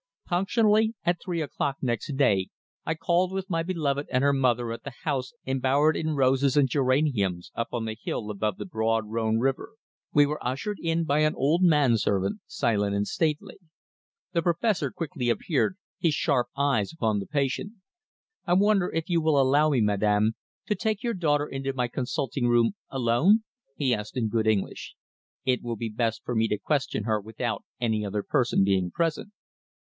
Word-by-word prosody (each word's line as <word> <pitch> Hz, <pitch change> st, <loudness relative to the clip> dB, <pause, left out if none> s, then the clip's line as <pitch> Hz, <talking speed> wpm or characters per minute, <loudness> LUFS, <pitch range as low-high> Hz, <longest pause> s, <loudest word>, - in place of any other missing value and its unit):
Punctually 215 Hz, +4 st, +2 dB
at 175 Hz, 0 st, 0 dB
three 175 Hz, -3 st, -3 dB
o'clock 145 Hz, -2 st, -2 dB
next 125 Hz, +2 st, -2 dB
day 100 Hz, -9 st, +2 dB, 0.4 s
I 160 Hz, -, -1 dB
called 175 Hz, +3 st, +1 dB
with 190 Hz, 0 st, -4 dB
my 165 Hz, -2 st, 0 dB
beloved 150 Hz, -5 st, -1 dB
and 130 Hz, +1 st, +1 dB
her 140 Hz, 0 st, +4 dB
mother 120 Hz, -3 st, +1 dB
at 115 Hz, -, -6 dB
the 140 Hz, -, -7 dB
house 135 Hz, -4 st, -2 dB
embowered 135 Hz, +4 st, +2 dB
in 155 Hz, -1 st, -1 dB
roses 135 Hz, 0 st, +2 dB
and 140 Hz, -3 st, +4 dB
geraniums 130 Hz, -, +1 dB
up 115 Hz, -, -2 dB
on 120 Hz, -2 st, -1 dB
the 110 Hz, 0 st, -4 dB
hill 105 Hz, -1 st, -3 dB
above 105 Hz, +1 st, -2 dB
the -, -, -6 dB
broad 115 Hz, -, 0 dB
Rhône 110 Hz, +1 st, 0 dB
river. 135 Hz, -, -1 dB, 0.4 s
We 145 Hz, 0 st, +6 dB
were 150 Hz, +1 st, -4 dB
ushered 140 Hz, -, -3 dB
in 165 Hz, 0 st, 0 dB
by 150 Hz, -2 st, +1 dB
an 155 Hz, 0 st, +2 dB
old 155 Hz, +6 st, +2 dB
man 150 Hz, -9 st, +4 dB
servant, 100 Hz, -2 st, 0 dB
silent 105 Hz, -3 st, 0 dB
and 100 Hz, 0 st, 0 dB
stately. 155 Hz, +5 st, -2 dB, 0.7 s
The 170 Hz, -2 st, +1 dB
Professor 170 Hz, -, +1 dB
quickly 135 Hz, -5 st, -3 dB
appeared, 155 Hz, +8 st, 0 dB, 0.2 s
his 165 Hz, -3 st, +2 dB
sharp 130 Hz, -6 st, +1 dB
eyes 140 Hz, -7 st, +1 dB
upon 110 Hz, -9 st, 0 dB
the 100 Hz, -, -6 dB
patient. 145 Hz, +8 st, -1 dB, 0.7 s
"I 175 Hz, -, +2 dB
wonder 200 Hz, 0 st, +3 dB
if 165 Hz, 0 st, -2 dB
you 170 Hz, -2 st, +2 dB
will 155 Hz, -3 st, +3 dB
allow 140 Hz, +3 st, +4 dB
me, 135 Hz, -5 st, +2 dB
Madame, 105 Hz, +1 st, +2 dB, 0.3 s
to 210 Hz, -, 0 dB
take 215 Hz, +1 st, -2 dB
your 235 Hz, -1 st, 0 dB
daughter 150 Hz, -6 st, +1 dB
into 135 Hz, -1 st, -4 dB
my 125 Hz, -2 st, -1 dB
consulting 130 Hz, 0 st, -2 dB
room 120 Hz, -1 st, +4 dB, 0.2 s
alone?" 135 Hz, -, +3 dB, 0.3 s
he 135 Hz, -4 st, +1 dB
asked 105 Hz, 0 st, -4 dB
in 115 Hz, -4 st, 0 dB
good 110 Hz, 0 st, 0 dB
English. 105 Hz, -3 st, -1 dB, 0.5 s
"It 130 Hz, -1 st, +1 dB
will 120 Hz, -1 st, -3 dB
be 115 Hz, +1 st, -4 dB
best 115 Hz, +1 st, -2 dB
for 125 Hz, -, -3 dB
me 110 Hz, 0 st, +2 dB
to 105 Hz, -, -1 dB
question 135 Hz, -4 st, -1 dB
her 110 Hz, 0 st, 0 dB
without 110 Hz, +3 st, -4 dB, 0.2 s
any 110 Hz, -3 st, 0 dB
other 100 Hz, 0 st, -2 dB
person 120 Hz, -5 st, +2 dB
being 95 Hz, -2 st, +1 dB
present." 165 Hz, +5 st, -2 dB
135 Hz, 180 wpm, -26 LUFS, 115-160 Hz, 0.7 s, We